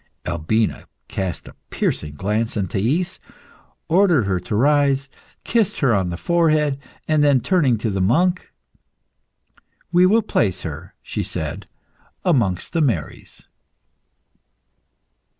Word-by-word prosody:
Albina 95 +7 -1 0.2
cast 95 -3 -4
a - - -11 0.2
piercing 75 -1 -2
glance 105 +7 -1
on 100 -2 -1
Thais, 150 - -1 0.7
ordered 175 - +4
her 95 -2 0
to 105 - -4
rise, 140 +2 +3 0.4
kissed 225 -5 0
her 130 -5 +3
on 95 -3 +1
the 85 - -4
forehead, 155 - +1 0.3
and 155 -2 +3
then, 140 -3 +4
turning 140 -4 +2
to 105 0 -2
the 95 -1 -1
monk 175 - +1 1.4
"We 180 +1 +5
will 220 +3 +3
place 95 - 0
her," 80 +2 -7
she - - -3
said, - - -5 0.6
"amongst 115 - +1
the 165 - +1
Marys." 110 - -3
130 Hz, 120 wpm, -21 LUFS, -, 1.4 s, We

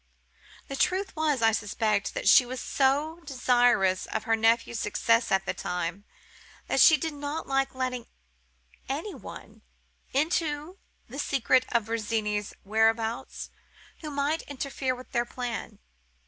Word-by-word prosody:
The 275 - -5
truth 375 +6 0
was, 300 -6 +1
I 225 - +6
suspect, 210 -1 -1
that - - -2
she - - +8
was 250 +1 -6
so 290 +6 +1
desirous 245 - +2
of 220 - -3
her 225 0 +2
nephews 225 +1 +2
success 230 +3 +2
by 195 - +5
this 190 -1 -5
time, 180 +3 -3 0.6
that - - 0
she 315 - +8
did 315 +2 -3
not 290 +2 -4
like 270 -1 0
letting 255 -2 -3 0.8
any 310 +10 -3
one - - -11 0.5
into 305 +3 -1 0.3
the 265 +5 -8
secret 260 -2 +2
of 235 -2 +2
Virginie's 215 -2 -2
whereabouts 225 +4 0 0.5
who 310 - -6
might 290 +3 0
interfere 270 -2 -2
with 255 +1 -12
their 240 -3 +1
plan. 240 -3 -5
250 Hz, 135 wpm, -28 LUFS, 225-285 Hz, 0.8 s, she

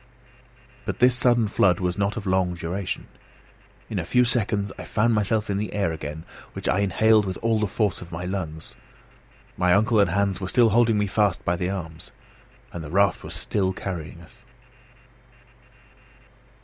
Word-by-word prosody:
But - - -4
this 125 0 +5
sudden 120 -2 +3
flood 90 -3 +2
was 90 -1 -1
not 100 +2 -1
of 105 - -5
long 95 -2 +1
duration. 90 +3 -4 0.8
In - - -3
a - - -2
few 125 - +3
seconds 105 -4 0
I - - -6
found 115 +2 +1
myself 105 0 0
in 100 - -1
the 105 - -4
air 100 -5 0
again, 80 0 -6 0.3
which - - -5
I 90 +9 +2
inhaled 105 +3 +3
with 95 -2 -4
all 115 -1 +2
the 105 - 0
force 105 +1 -1
of 85 0 -10
my 85 +2 -5
lungs. 80 -4 -5 0.8
My 90 0 +3
uncle 110 +2 +3
and 100 -3 +4
Hans 100 0 0
were 95 - -3
still 115 +4 +4
holding 115 0 +3
me 105 - +1
fast 100 -3 0
by 85 - +1
the 90 +1 -2
arms; 80 -5 -6 0.6
and 85 - -6
the 75 - -8
raft 100 +2 +2
was - - -7
still 95 -2 -1
carrying 85 -3 -6
us. 115 +8 -17
100 Hz, 175 wpm, -24 LUFS, 90-110 Hz, 0.8 s, this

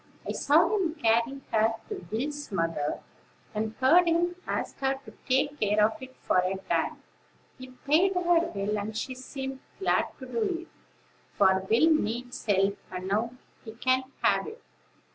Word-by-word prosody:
I - - -1
saw 330 +8 +3
him 350 -6 0
carry 235 +1 +1
her 225 0 +3
to 410 -3 -6
Will's 290 +5 -3
mother, 165 -5 -1 0.5
and 220 +1 -2
heard 335 +7 +6
him 345 +1 +2
ask - - -3
her 270 0 +1
to - - -12 0.2
take 285 +3 +2
care 210 0 +2
of 220 - -2
it 260 0 -10
for - - +3
a 185 +1 0
time. 190 - -2 0.6
He 255 - -8
paid 310 +9 +2
her 360 - +1 0.2
well, 340 - -2 0.3
and 215 +2 -4
she 255 +3 -3
seemed 265 +1 -6 0.2
glad 385 - +2
to - - -9
do 415 -7 -1
it; 340 - -14 0.7
for 190 -1 +3
Will 280 +9 +5
needs 245 -2 -2
help, 200 0 +2
and 185 0 -5
now 225 +4 0 0.3
he 220 - -9
can 255 +3 +1 0.2
have - - +3
it. 440 +2 -10
255 Hz, 165 wpm, -28 LUFS, 215-310 Hz, 0.7 s, heard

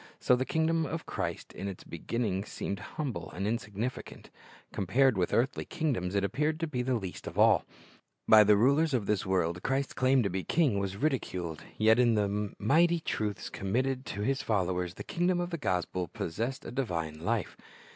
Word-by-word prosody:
So 125 - +4
the 130 +1 -1
kingdom 160 0 +1
of 165 0 -4
Christ - - -4
in 100 - -5
its 95 -2 -6
beginning 100 +3 -2
seemed 100 -1 -4
humble 125 - -5
and 95 +3 -3
insignificant. 110 +2 -4 0.4
Compared 120 +7 +3
with 90 -2 0
earthly 125 +4 +1
kingdoms 120 - -2
it 100 - +2
appeared 150 - 0
to - - +1
be 135 -6 -2
the 125 +1 0
least 95 -6 -5
of - - -7
all. - - +5 0.6
By 110 -1 +9
the 105 0 +5
rulers 140 +6 +3
of 115 -5 0
this 105 -1 0
world 90 -2 0
Christ's 135 +4 -1
claim 130 0 +3
to 100 - 0
be 95 - -1
a - - -5
king 135 - +2
was 100 0 -3
ridiculed. 90 - -2 0.2
Yet 110 +2 +5
in 120 -2 +4
the 105 0 -1
mighty 165 +10 +3
truths 105 -9 -3
committed 130 +7 -1
to 100 - -4
His 135 +6 0
followers 90 -7 -1
the - - -7
kingdom 175 +1 0
of 175 0 -2
the 170 - -3
gospel 90 - -1
possessed 115 - -4
a - - -6
divine 85 - -3
life. 105 +2 -1
110 Hz, 185 wpm, -30 LUFS, 95-135 Hz, 0.6 s, By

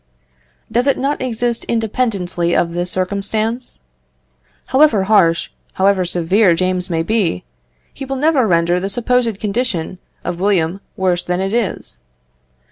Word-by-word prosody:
Does 245 +3 +1
it 275 - +3
not 280 +2 -1
exist 240 -1 -1
independently 200 -7 -1
of 170 -1 +1
this 175 +1 -1
circumstance? 205 - 0 0.8
However 260 -7 +3
harsh, 175 -6 +3 0.2
however 190 -1 +2
severe 180 +2 +2
James 185 +1 -1
may 165 -1 0
be, 180 - 0 0.5
he 275 - -8
will 270 +1 -3
never 275 -3 +2
render 170 0 +2
the 195 +2 -3
supposed 235 -1 0
condition 200 -5 -2 0.2
of 175 -1 -4
William 190 -2 +1 0.2
worse 180 -2 0
than 180 0 -2
it 195 +2 -2
is. 230 - -2
195 Hz, 130 wpm, -17 LUFS, 175-235 Hz, 0.8 s, it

